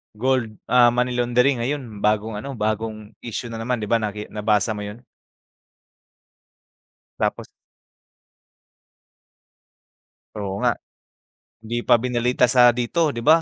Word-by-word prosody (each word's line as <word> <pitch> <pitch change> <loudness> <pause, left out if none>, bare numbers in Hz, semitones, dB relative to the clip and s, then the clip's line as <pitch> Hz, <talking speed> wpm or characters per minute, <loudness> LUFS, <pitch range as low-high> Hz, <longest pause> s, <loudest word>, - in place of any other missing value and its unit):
gold, 120 -1 0
ah, 125 -1 +5
money 125 +1 +1
laundering, 125 +2 +2
ayun, 120 -4 -4
bagong 105 0 0
ano, 135 +5 -6
bagong 110 0 -3
issue 115 0 -6
na 115 - -6
naman 115 0 -2
‘di 105 - -3
ba 115 - +4
naki 105 -1 -5
nabasa 105 0 +1
mo 105 - -4
yun? 105 +4 -8 2.2
Tapos - - -1 2.9
Oo 100 -1 -4
nga. - - +2 0.9
'Di 120 +2 -3
pa 120 - +4
binalita 125 +1 +1
sa 125 -1 +6
dito 125 +7 +1
‘di 120 -5 -4
ba? 160 +2 +6
115 Hz, 120 wpm, -22 LUFS, 105-125 Hz, 2.9 s, sa